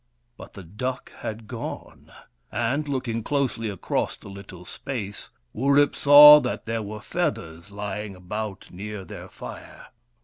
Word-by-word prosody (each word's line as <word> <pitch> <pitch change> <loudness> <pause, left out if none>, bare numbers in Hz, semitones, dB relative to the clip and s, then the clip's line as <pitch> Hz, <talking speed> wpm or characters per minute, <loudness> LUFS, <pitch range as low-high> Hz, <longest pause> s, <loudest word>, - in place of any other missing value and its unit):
But - - -12
the 95 - -10
duck 125 +9 -5
had 110 0 -6
gone, - - -8 0.4
and, 130 +6 -1
looking 125 -5 -2
closely 125 -4 -1
across 100 -3 -2
the - - -13
little 95 -2 -11
space, 105 -4 -6 0.2
Wurip 140 +4 +3
saw 150 +1 +10
that 125 -3 -4
there 115 0 -2
were 105 +1 -7
feathers 80 -1 -3
lying 100 0 -5
about 100 +2 -6
near 100 +1 -7
their - - -10
fire. - - -11
110 Hz, 135 wpm, -25 LUFS, 100-130 Hz, 0.4 s, saw